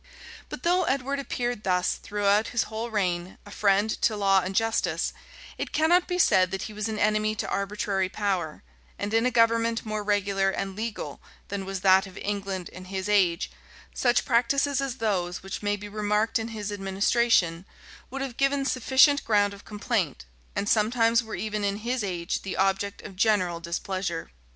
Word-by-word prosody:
But - - -7
though 360 +1 +3
Edward 275 0 -1
appeared 245 -5 -3
thus, 180 -1 +1
throughout 205 +1 +1
his 240 - 0
whole 225 +2 -5
reign, 180 -4 -1
a 205 - -12
friend 200 0 +2
to 215 - +2
law 195 -1 +4
and 190 +1 -4
justice, 225 +1 0 0.5
it - - -3
cannot 345 +3 +3
be 360 - -1
said 185 - +4
that 190 0 -4
he 215 - -7
was 210 +1 -3
an 215 - -3
enemy 215 +1 +1
to - - -3
arbitrary 200 -1 -1
power; 190 - -2 0.3
and 205 +2 -3
in 225 +2 +3
a - - +3
government 230 -1 +2
more 215 -1 -3
regular 200 -1 +1
and 195 0 -3
legal 220 +1 -5 0.3
than 195 -1 -4
was 195 -1 -4
that 190 0 +5
of 185 - -13
England 195 -3 -3
in 185 - -11
his 190 +1 -4
age, 190 -4 +2 0.4
such 245 -1 +2
practices 275 +3 +2
as 270 -3 -3
those 190 -7 -1
which 195 - -6
may 205 0 0
be 205 0 -8
remarked 210 +3 0
in 225 - -3
his 215 -2 -5
administration, 195 -2 +1 0.5
would 270 +1 -4
have 255 -3 -6
given 275 0 +1
sufficient 265 +3 +4
ground 205 -2 +2
of 200 - -13
complaint, 205 - -2 0.3
and 205 - -1
sometimes 230 +2 +3
were 220 -1 -6
even 215 -1 -3
in 200 0 0
his 240 +2 -2
age 175 -3 -2
the 195 - -5
object 195 +1 0
of 195 - -9
general 185 -4 +2
displeasure. 170 - -3
205 Hz, 180 wpm, -26 LUFS, 195-230 Hz, 0.5 s, that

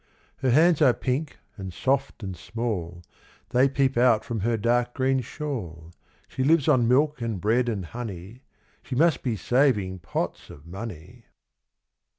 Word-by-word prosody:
Her 130 - 0
hands 160 +5 +4
are 130 -5 +5
pink, 140 +4 -2 0.2
and 95 -2 -6
soft, 135 +4 -1
and 95 -2 -5
small, 90 -4 -4 0.5
They 130 +2 +3
peep 135 -1 +1
out 120 -3 +4
from 120 -5 -3
her 115 +3 0
dark 120 +2 +1
green 130 0 +1
shawl. 95 - -6 0.4
She 130 - -3
lives 155 0 +3
on 130 -6 +4
milk, 145 +2 +2
and 115 -4 -2
bread, 120 +5 +1
and 100 -6 -3
honey, 110 +1 -8 0.4
She 130 - -6
must 160 +4 +3
be 120 -4 -1
saving 105 -4 +1
pots 75 - -4
of 75 - -13
money. 100 +3 -9
120 Hz, 155 wpm, -25 LUFS, 100-135 Hz, 0.5 s, are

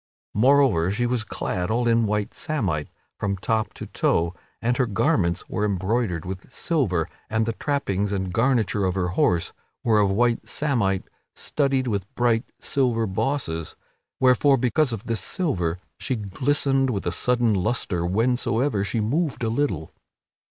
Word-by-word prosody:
Moreover, 125 -7 +4
she 115 +5 0
was 120 -2 0
clad 90 -3 -3
all 120 +2 +1
in 115 -1 +3
white 105 0 -1
samite 95 - -2 0.3
from 100 -1 -1
top 110 +3 0
to - - -6
toe 85 +1 +1 0.3
and 120 +1 +1
her 125 - +2
garments 95 - +1
were 105 - -2
embroidered 100 -2 0
with 95 +6 -7
silver; 110 - 0 0.2
and 110 0 +1
the 115 - -1
trappings 105 -9 -1
and 95 -2 -2
garniture 115 -3 +2
of 95 -1 0
her 90 -2 0
horse 90 -1 +1 0.3
were 110 -3 +4
of 100 -1 +3
white 120 +4 +1
samite 115 -10 0 0.3
studded 135 -3 0
with 100 -3 -2
bright 120 -1 +2
silver 120 -5 +1
bosses, 95 - -2 0.4
wherefore, 130 +2 +5
because 130 +3 +2
of 110 -3 -4
this 115 -5 -1
silver, 90 - -1 0.2
she 130 - -1
glistered 135 +6 +1
with 100 -6 -2
a 90 - 0
sudden 120 +3 +2
lustre 95 -2 0
whensoever 115 +3 +1
she 115 +3 -1
moved 140 +6 0
a 115 - +1
little. 110 - -1
110 Hz, 150 wpm, -24 LUFS, 95-125 Hz, 0.4 s, wherefore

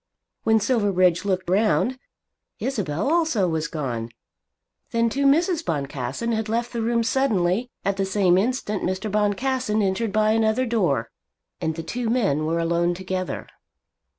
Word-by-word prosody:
When 220 0 +3
Silverbridge 200 -6 +2
looked 185 -2 -1
round, 220 +7 +2 0.6
Isabel 195 - -2
also 315 - +2
was 160 -1 -1
gone. 125 -8 -4 0.8
Then 230 0 +1
too 275 +2 +2
Mrs. 330 +3 +3
Boncassen 140 - -3
had 220 -1 -1
left 235 +2 -1
the 235 - -2
room 235 +1 +1
suddenly. 225 -3 +1 0.2
At 200 0 0
the 195 - +1
same 190 -2 +3
instant 210 0 0
Mr. 185 +3 -2
Boncassen 215 +3 0
entered 195 +3 0
by 215 +1 +3
another 225 +3 +2
door, 175 - 0 0.5
and 160 0 -1
the 165 - -5
two 240 +5 -3
men 195 - +1
were 165 +1 0
alone 170 +1 +1
together. 185 0 -4
205 Hz, 145 wpm, -24 LUFS, 175-235 Hz, 0.8 s, When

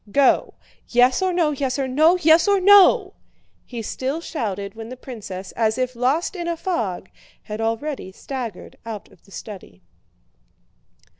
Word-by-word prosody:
Go! 275 +3 +3 0.3
Yes 250 +4 +3
or 375 -1 +1
no, 340 -4 +1
yes 270 -2 -2
or 270 -1 -1
no, 310 +7 +4
yes 325 +1 +5
or 400 -1 +4
no!" 400 +1 +6 0.5
he 235 -2 -6
still 265 +8 -3
shouted 200 - -4
when 225 0 -9
the 255 - -8
princess, 200 -7 -8
as 220 0 0
if 255 -1 -2
lost 270 +11 0
in 345 -2 -4
a 340 -1 -2
fog, 225 - -3 0.4
had 215 +1 -6
already 225 -1 -3
staggered 235 -1 -7
out 225 -3 -8
of - - -23
the 195 - -21
study. 185 - -10
255 Hz, 155 wpm, -22 LUFS, 220-325 Hz, 0.5 s, no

